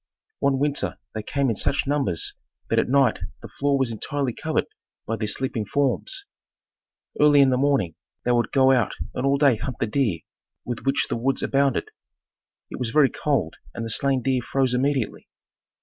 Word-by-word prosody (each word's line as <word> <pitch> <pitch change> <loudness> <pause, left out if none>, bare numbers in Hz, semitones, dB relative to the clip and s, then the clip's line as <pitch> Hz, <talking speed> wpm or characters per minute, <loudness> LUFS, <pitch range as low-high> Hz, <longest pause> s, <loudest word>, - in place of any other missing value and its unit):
One 140 -1 +2
winter 145 +1 -1 0.2
they 110 - -3
came 135 +3 0
in - - -2
such 135 - 0
numbers 135 - 0 0.4
that - - +4
at - - 0
night 135 -3 +3 0.2
the - - -6
floor 140 0 0
was 130 -3 0
entirely 130 +3 -2
covered - - -1 0.4
by 115 - -1
their 110 -1 -3
sleeping 120 0 -2
forms. 145 - -1 0.9
Early 150 -1 +6
in 135 -1 +6
the 125 - +2
morning, 135 - +1 0.3
they 125 - +2
would 120 -1 +1
go 135 -1 +5
out 120 -6 +2 0.2
and 130 - -1
all 140 0 +3
day 140 -5 +4
hunt 120 +3 -5
the - - +1
deer, 105 - 0 0.4
with 120 +1 -5
which 135 +1 +2
the - - -2
woods 130 +3 0
abounded. 140 - +1 0.8
It - - -6
was 125 -3 -1
very 140 +1 +4
cold 140 - -1 0.2
and 115 - -4
the 115 - -4
slain 135 +1 +1
deer 130 -2 +1
froze 130 +1 0
immediately. 130 -2 -1
135 Hz, 180 wpm, -24 LUFS, 115-140 Hz, 0.9 s, Early